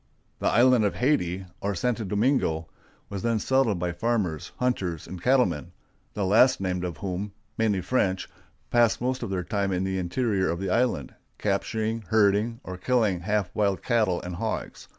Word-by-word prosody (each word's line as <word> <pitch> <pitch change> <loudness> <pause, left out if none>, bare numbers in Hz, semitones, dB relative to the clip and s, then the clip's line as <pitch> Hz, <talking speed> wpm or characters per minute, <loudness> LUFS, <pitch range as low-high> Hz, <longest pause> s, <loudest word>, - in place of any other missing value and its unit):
The - - 0
island 125 0 +5
of 100 - +1
Hayti, 95 - +1
or 100 0 -2
Santo 120 +5 -1
Domingo, 100 - +1 0.4
was 100 -2 -5
then 115 +1 +1
settled 120 -2 +2
by 90 0 -1
farmers, 90 -4 -1
hunters, 95 -11 -1
and 90 -2 -8
cattlemen, 95 - +2 0.4
the 100 - 0
last 115 +7 +5
named 90 -2 -2
of 85 -4 -4
whom, 95 +2 -4 0.2
mainly 105 -4 +1
French, 95 -5 0 0.4
passed 120 -2 +4
most 130 +1 -1
of - - -3
their 95 -2 -2
time 100 0 -1
in 90 0 0
the 95 0 -1
interior 95 +1 0
of 85 - -2
the 95 -1 -2
island, 115 - 0 0.2
capturing, 110 +2 -1
herding, 110 +2 +2
or 95 0 -6
killing 110 -3 +1
half 100 +1 -1
wild 100 -2 0
cattle 110 -7 +2
and 90 -1 -5
hogs. - - -4
100 Hz, 170 wpm, -26 LUFS, 90-115 Hz, 0.4 s, island